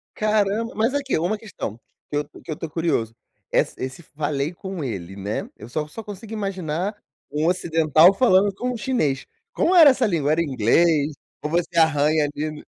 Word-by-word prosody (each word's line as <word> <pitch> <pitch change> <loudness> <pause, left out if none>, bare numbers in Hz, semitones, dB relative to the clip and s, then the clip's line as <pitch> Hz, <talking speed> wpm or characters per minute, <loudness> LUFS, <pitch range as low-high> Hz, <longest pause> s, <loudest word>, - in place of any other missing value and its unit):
Caramba, 215 +1 +1
mas 225 +5 +1
aqui, 280 - 0
uma 190 +6 -1
questão 185 - -6 0.3
que 145 - -2
eu 145 - 0 0.2
que - - -9
eu 155 - -1
estou 160 0 -7
curioso. 150 -9 -1 0.4
Essa - - +1
esse 130 +6 -5
falei 145 +1 -3
com 190 -2 -6
ele, 95 -7 -5
né? 100 +2 -4
Eu 110 - -11
só 150 +4 -2
só 220 +9 -8
consigo 205 +1 -9
imaginar 190 -2 -2 0.4
um 150 +2 0
ocidental 165 -1 +4
falando 200 -3 +4
com 250 +6 -3
um - - -4
chinês. 210 - -1 0.3
Como 355 - +2
era 325 -5 +9
essa 260 -2 +2
língua? 155 -7 +1
Era 165 +2 +2
inglês 145 +3 +2 0.3
ou 150 - -3
você 170 0 0
arranha 155 -1 +3
ali 150 +1 -3
no 150 0 -10
165 Hz, 185 wpm, -23 LUFS, 150-205 Hz, 0.4 s, era